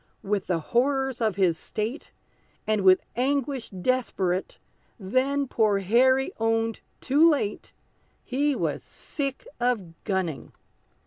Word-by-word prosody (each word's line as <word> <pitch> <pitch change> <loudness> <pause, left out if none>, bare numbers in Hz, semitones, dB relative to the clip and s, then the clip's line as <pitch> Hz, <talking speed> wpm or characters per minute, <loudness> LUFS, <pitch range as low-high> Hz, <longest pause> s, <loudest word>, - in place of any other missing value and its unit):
With 200 -1 -1
the 180 - +1
horrors 265 - 0
of 215 -4 +1
his 180 -4 +2
state, 225 +7 -4 0.5
And 215 -1 +1
with 185 -1 +5
anguish 270 0 -1
desperate, 190 -3 -1 0.4
Then 265 +8 0
poor 215 -4 +2
Harry 255 +7 +3
owned 225 0 0 0.2
too 295 +5 +5
late, 275 -10 -1 0.5
He 285 +3 0
was - - -2
sick 275 -2 -5
of 235 -9 0
gunning! 185 -7 -2
230 Hz, 115 wpm, -26 LUFS, 195-265 Hz, 0.5 s, with